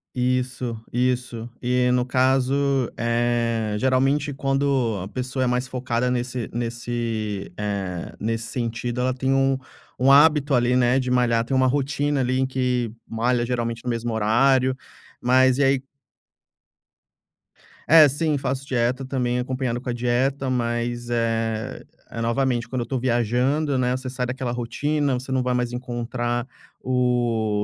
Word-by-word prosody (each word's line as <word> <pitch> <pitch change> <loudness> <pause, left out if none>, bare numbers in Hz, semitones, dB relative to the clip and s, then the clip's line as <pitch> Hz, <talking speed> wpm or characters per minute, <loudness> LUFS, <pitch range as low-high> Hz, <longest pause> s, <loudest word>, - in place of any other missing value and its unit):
Isso, 125 -1 -1
isso. 125 -1 -1
E, 125 0 +2
no 125 0 +2
caso, 130 +1 +2 0.4
eh, 115 -2 0
geralmente, 135 +3 +1
quando 135 -5 0
a 95 - -5
pessoa 130 +4 -3
é - - +1
mais 125 +1 -1
focada 125 -1 -1
nesse 125 -1 -2
nesse 115 -3 -3
eh, 100 -4 -3
nesse 115 +1 -2
sentido 120 0 -3
ela 130 +1 +1
tem 130 +1 0
um 135 0 +2 0.4
um 130 +2 +4
hábito 145 0 +5
ali, 120 0 +2
né, 125 +1 +3
de 130 -1 -2
malhar, 120 -2 +2
tem 135 - -1
uma 130 0 +4
rotina 145 +1 0
ali 130 +1 0
em 130 - +2
que 125 -3 -1 0.2
malha, 120 +1 0
geralmente, 115 -1 -2
no - - -1
mesmo 115 0 -2
horário, 130 +4 +3 0.5
mas 130 +1 +4
e - - +4
aí 135 -1 +3 2.1
É, 155 -1 +8
sim, 150 +2 0
faço 135 0 -3
dieta. 125 +1 0
Também 125 -2 -1
acompanhado 125 -1 -2
com 130 - -6
a - - 0
dieta, 130 +3 0
mas, 120 -1 -2
eh 115 -1 -1 0.3
eh, 115 - -4
novamente 120 0 0
quando 130 -2 -3
eu - - 0
estou 130 +2 -3
viajando, 130 +4 +1
né, 125 0 +1
você 130 0 -5
sai 125 0 -2
daquela 125 0 -3
rotina, 140 +4 -1
você 130 +1 -4
não 130 -1 +1
vai 125 0 0
mais 125 -1 -1
encontrar 120 0 -3 0.4
o 120 -4 +1
125 Hz, 150 wpm, -23 LUFS, 120-130 Hz, 2.1 s, É